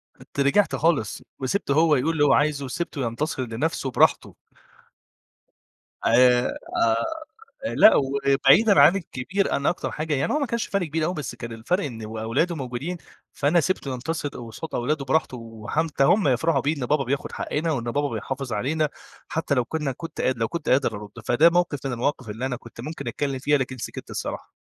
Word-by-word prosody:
كنت - - -11
رِجِعت 140 +9 +3
خالص 155 -11 0 0.2
وسِبته 140 +2 -1
هو 155 0 +4
يقول 140 +5 +1
اللي 145 -2 +2
هو 140 - +5
عايزه 145 -2 +1
وسِبته 150 +1 -4
ينتصر 130 +3 -2
لنفسه 135 +4 -2
براحته. - - +2 1.7
آآ - - +3
آه، 125 +1 +5 1.2
آآ، - - -2
لأ، - - +8
وبعيدًا 140 +10 +4
عن 180 - +7
الكبير، 185 +3 -2
أنا 140 - 0
أكتر 175 - -3
حاجة 155 0 -2
يعني 135 0 0
هو 300 - +2
ما 280 - 0
كانش 235 0 -2
فَرْق 195 -3 -1
كبير 155 +1 -1
أوي 180 - -1
بس 150 -7 -5
كان 120 -1 -7
الفَرْق 140 - -1
إنه 115 -5 -6
و 110 0 -7
أولاده 135 +10 0
موجودين 135 +6 -4 0.4
فأنا 155 +5 +2
سِبته 145 -5 -1
ينتصر 145 +4 -3
قصاد 120 +4 -8
أولاده 140 +3 -1
براحته 135 -1 0
وحتّى 120 +7 -2
هم 195 +2 +4
يفرحوا 135 +3 +2
بيه 150 +3 0
إن 125 - -3
بابا 145 0 +1
بياخُد 140 +3 -2
حقّنا 160 +2 -2
وإن 120 -5 -2
بابا 145 +5 0
بيحافظ 130 +2 -4
علينا 150 +8 0 0.4
حتّى 160 -3 -1
لو 125 - +1
كُنّا 150 0 -2
كنت 165 +4 -8
قادر 130 -2 +1
لو 115 - +1
كنت 170 -2 -5
قادر 130 -5 +2
أرُد. 105 0 -9
فده 155 +8 +5
موقف 170 -6 0
من 135 - -2
المواقف 125 -1 -2
اللي 115 +5 -3
أنا 125 -2 -2
كنت 115 -1 -12
ممكن 155 +7 -6
أتكلّم 140 -2 -2
فيها، 145 +2 +2
لكن 130 -1 -3
سِكِت - - -7
الصراحة. - - -5
140 Hz, 185 wpm, -24 LUFS, 125-160 Hz, 1.7 s, لأ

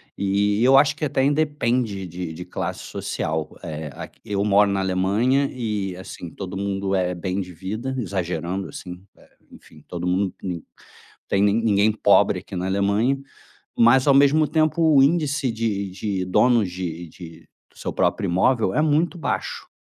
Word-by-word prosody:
e 100 +2 +1
eu 135 +2 +6
acho 140 +1 +4
que 155 - -2
até 140 -2 0
independe 130 -8 0
de 90 -1 -6
de 90 +3 -8
classe 90 - -4
social. 80 0 -4
Eh, 80 -2 -5
aqui - - -10
eu 100 -1 -1
moro 105 0 +4
na 100 0 0
Alemanha 100 +9 +1
e, 105 -6 -3
assim, 90 -2 -9
todo 95 +3 -7
mundo 100 0 -2
é 90 -1 0
bem 95 +2 -3
de 90 -1 -8
vida, 110 +10 -5
exagerando, 95 -3 -3
assim, 90 -1 -9 0.2
eh, - - -21 0.2
enfim, - - -17
todo 85 0 -5
mundo, 95 +1 +1
ni 90 -2 -2
não 80 - -13 0.7
tem 100 - +2
ni 100 0 +3
ninguém 110 -2 +3
pobre 110 - +3
aqui - - -11
na 90 0 -2
Alemanha, 100 +7 +1 0.6
mas, 125 +4 +5
ao 140 - +6
mesmo 145 +3 +5
tempo, 155 +1 +1
o 135 - +7
índice 145 -4 +1
de 110 -3 -2
de 95 0 -3
donos 105 +2 +3
de 85 -2 -5
de 85 0 -13 0.3
seu - - -5
próprio - - 0
imóvel 95 +3 +2
é - - +2
muito 160 +3 +1
baixo, 165 - -3
100 Hz, 170 wpm, -23 LUFS, 90-125 Hz, 0.7 s, o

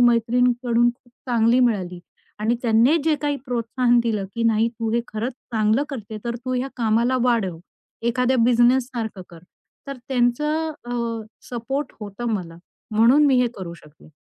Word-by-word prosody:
मैत्रिणींकडून 240 0 +3
खूप 240 0 -22 0.2
चांगली 235 +1 +3
मिळाली. 185 -7 0 0.4
आणि 220 +3 +1
त्यांनी 235 +7 +4
जे 320 -1 +3
काही 290 -1 0
प्रोत्साहन 240 0 +1
दिलं 215 -4 -1
की 235 - -2
नाही 225 0 +3
तू 230 -1 -4
हे 235 - +2
खरंच 230 +3 -3
चांगलं 220 +1 0
करते 220 -6 -7
तर 235 0 -2
तू 255 +2 -5
ह्या 255 +2 -1
कामाला 235 +2 +2
वाढव. 215 -9 +1 0.4
एखाद्या 250 +2 +1
बिझनेस 245 +1 +4
सारखं 225 -7 -5
कर. 165 -1 -14 0.4
तर 275 -1 -5
त्यांचं 300 +6 +1
अ, 240 - -6 0.6
सपोर्ट 265 +4 -3
होतं 210 +3 -6
मला. 165 -4 -5 0.3
म्हणून 235 +7 +5
मी 260 -3 +4
हे 250 - +3
करू 175 -3 -7
शकले. 155 -1 -18
235 Hz, 155 wpm, -22 LUFS, 220-250 Hz, 0.6 s, म्हणून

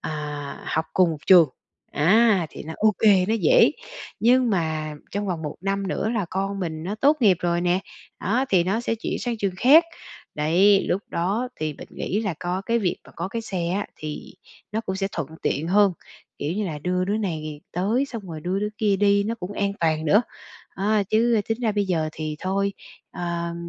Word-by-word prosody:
à, - - -5 0.6
học 160 +1 0
cùng 175 -4 +3
trường, 175 -5 +8 0.4
á 195 +2 +4
thì - - -9
nó 160 - -7
ô 215 -1 +3
kê, 195 -4 +5
nó 225 - +2
dễ, 485 - +5 0.5
nhưng 245 +1 +4
mà 155 -5 -1 0.2
trong 205 +1 -3
vòng 175 -4 -3
1 150 -1 -5
năm 195 +1 -1
nữa 210 +3 -1
là 215 -5 0
con 195 +1 -2
mình 160 -3 -4
nó 190 +5 -3
tốt 280 +7 +3
nghiệp 200 -6 +5
rồi 170 0 0
nè, 175 +1 +2 0.4
đó, 240 +7 +1
thì 180 -3 +3
nó 200 +6 0
sẽ 235 - -1
chuyển 225 - -4
sang 240 -2 -2
trường 195 -3 -1
khác. 295 - +7 0.5
Đấy, 180 +7 +4
lúc 195 +3 0
đó 200 +9 -1
thì 155 -1 -2
mình - - -11
nghĩ 205 - -2
là 200 -7 -2
có 180 +2 -2
cái 235 0 +2
việc 190 -6 0
mà - - -16
có 170 +2 -3
cái 230 +3 -4
xe 180 -6 -3
á, 200 +3 -1
thì 155 +3 -7 0.4
nó 220 - 0
cũng 190 -3 -4
sẽ 195 0 -1
thuận 160 -5 -3
tiện 155 +4 -1
hơn, 200 0 +4 0.5
kiểu 150 +3 -2
như 205 +1 -2
là, 155 -4 -4
đưa 180 +4 -1
đứa 200 +3 0
này 155 -7 -4
tới 210 +10 +1
xong 230 -5 -7
rồi 160 -2 -6
đưa 180 +4 -1
đứa 210 +1 -1
kia 205 -3 +2
đi 200 0 +3
nó 225 +2 -1
cũng 200 -3 -7
an 200 -1 -1
toàn 160 -1 +1
nữa. 205 +9 +4 0.5
À, 210 +1 +1
chứ 225 0 +3
tính 225 +2 -1
ra 225 -3 +1
bây 205 -1 +1
giờ 165 -4 0
thì 155 -1 -4
thôi, 200 +2 -1 0.4
ờ, 170 -1 -3
195 Hz, 210 wpm, -24 LUFS, 170-215 Hz, 0.6 s, trường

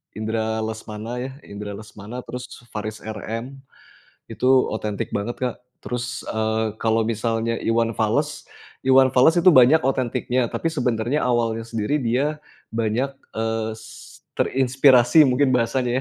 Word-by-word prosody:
Indra 110 0 -2
Lesmana 110 +2 -5
ya, 130 +2 -4
Indra 105 0 -7
Lesmana 105 +3 -9
terus 125 0 -6 0.2
Faris 110 0 -5
RM, 115 +5 -6 0.7
itu - - -2 0.2
otentik 105 -2 -3
banget, 105 +4 -3
Kak. 125 -2 -1 0.3
Terus, 125 0 -4
eee, 110 0 -1
kalau 115 0 +2
misalnya 115 0 -1
Iwan 115 0 0
Fals 145 +7 0 0.4
Iwan 130 0 +6
Fals 145 +7 +5
itu 185 - +5
banyak 130 +3 +7
otentiknya 130 -1 0
tapi - - -3
sebenarnya 125 -1 0
awalnya 115 -2 0
sendiri 115 +4 -1
dia 130 +6 0 0.4
banyak, 115 +4 0 0.3
eee, 110 0 -1
s 110 0 -13 0.2
terinspirasi 130 +1 +5
mungkin 130 +2 +2
bahasanya 120 +1 0
115 Hz, 125 wpm, -22 LUFS, 110-130 Hz, 0.7 s, banyak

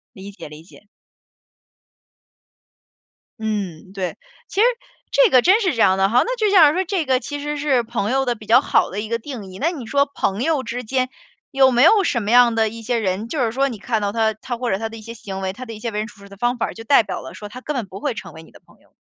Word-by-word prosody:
理 200 +1 -9
解， 195 - -11
理 150 +1 -12
解。 200 +3 -19 2.5
嗯， 200 -5 -4
对， 190 -2 -4 0.3
其 405 - -1
实 - - +6 0.5
这 - - +5
个 255 -5 +6
真 390 - +4
是 370 - +2
这 230 - -1
样 190 0 +4
的 195 0 +3
哈， 240 +3 +4
那 - - -2
就 430 -2 +2
像 315 -7 +7
说 370 - 0
这 360 -3 -1
个 260 -1 +2
其 290 +2 -6
实 295 +1 -3
是 280 -4 +1
朋 230 -1 -2
友 270 0 +1
的 245 -1 0
比 215 - -13
较 235 +5 +5
好 - - +2
的 200 - -4
一 215 - -5
个 230 - 0
定 235 -3 -8
义。 185 - -10
那 330 - +1
你 275 -9 -7
说 280 +5 +2
朋 235 -5 -2
友 310 -4 +1
之 245 +1 -5
间， 255 +2 -1 0.4
有 270 -2 +5
没 245 +1 +4
有 400 +5 +6
什 240 -9 0
么 205 - -4
样 245 -1 +6
的 220 -1 +2
一 230 +1 -9
些 240 +1 -1
人， 195 +1 -2
就 295 - -4
是 225 - 0
说 270 +4 +1
你 240 - -6
看 225 0 -1
到 200 -1 -1
他 220 0 +1
他 235 +3 -6
或 245 0 -2
者 190 - +1
他 225 +2 -4
的 225 - -10
一 - - -11
些 230 +2 -9
行 195 -4 -7
为， 190 0 -2
他 255 +6 -9
的 230 - -8
一 215 - -9
些 230 0 -4
为 210 - -3
人 215 - -3
处 225 - -16
事 200 - -14
的 200 - -13
方 240 +3 0
法， 230 - -2
就 225 - -10
代 235 0 +5
表 - - -5
了 - - -10
说 210 -1 -9
他 255 +4 -10
根 300 - -4
本 240 -5 -2
不 190 +2 -9
会 280 +1 -2
成 - - -9
为 160 - -11
你 - - -18
的 - - -17
朋 - - -24
友。 - - -30
235 Hz, 300 characters per minute, -21 LUFS, 210-270 Hz, 2.5 s, 像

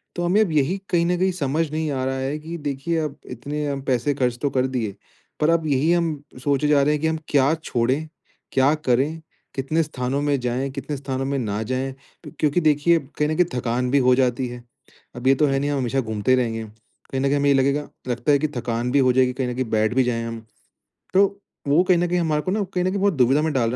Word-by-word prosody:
तो 175 - -2
हमें 185 +5 +3
अब 195 -7 +1
यही 155 +5 +1
कहीं 170 -1 +2
न 180 +1 +1
कहीं 190 +1 +2
समझ 155 -1 -1
नहीं 155 -1 -1
आ 130 -2 -2
रहा 135 0 -1
है 135 +3 -2
कि 165 +2 -6
देखिए, 145 +3 -2
अब 150 -2 -3
इतने 140 +2 -3
पैसे 130 +3 +1
खर्च 125 -3 0
तो 145 - +1
कर 130 -1 +1
दिए। 115 -6 -3 0.4
पर 150 - +2
अब 165 -1 +2
यही 145 +3 +2
हम 160 -4 -1 0.2
सोचे 145 +1 +1
जा 145 -2 +4
रहे 150 +2 +3
हैं 150 - -2
कि 160 - +1
हम 160 0 0
क्या 140 +1 +3
छोड़े, 120 0 +1 0.5
क्या 135 +3 +4
करें? 150 +2 0 0.3
कितने 140 +5 0
स्थानों 135 -2 -3
में 145 -1 +1
जाएँ, 125 +2 -2
कितने 140 +2 -5
स्थानों 135 -1 -3
में 140 0 -1
ना 105 -3 -2
जाएँ। 130 +3 -2 0.5
क्योंकि 155 +3 +2
देखिए 155 +2 +3
कहीं 150 +1 -3
न 155 - 0
कहीं 180 0 +3
थकान 125 +1 -1
भी 140 - +4
हो 125 - +6
जाती 125 0 +1
है। 120 0 -8 0.5
अब 120 +2 -3
ये 135 - +6
तो 150 - +3
है 135 0 +1
नहीं 145 - -1
हम 145 - 0
हमेशा 130 +2 0
घूमते 110 +1 -1
ही 130 - +5
रहेंगे। 115 -2 -1
कहीं 110 +4 -8
न - - -1
कहीं 140 - +2
हमें 140 0 +2
ये - - +6
लगेगा 140 +2 +1 0.2
लगता 125 +4 0
है 140 - +4
कि 155 - +1
थकान 120 +1 -2
भी 140 - +3
हो 130 -1 +4
जाएगी 130 0 +3
कहीं 130 0 -2
न - - -3
कहीं 130 0 -1
बैठ 110 +1 +2
भी 130 - +4
जाएँ 115 -2 -1
हम। 115 0 -5 0.7
तो 195 +2 +6 0.4
वो 150 +5 +4
कहीं 185 -1 +3
न 175 - +1
कहीं 180 +1 0
हमारे 155 -3 +1
को 185 - -3
ना 210 0 0
कहीं 180 - 0
न - - +2
कहीं 200 - -2
बहुत 200 -1 +3
दुविधा 135 +1 +3
में 155 0 0
डाल 120 -4 +1
रहे - - -3
140 Hz, 255 wpm, -23 LUFS, 125-155 Hz, 0.7 s, हो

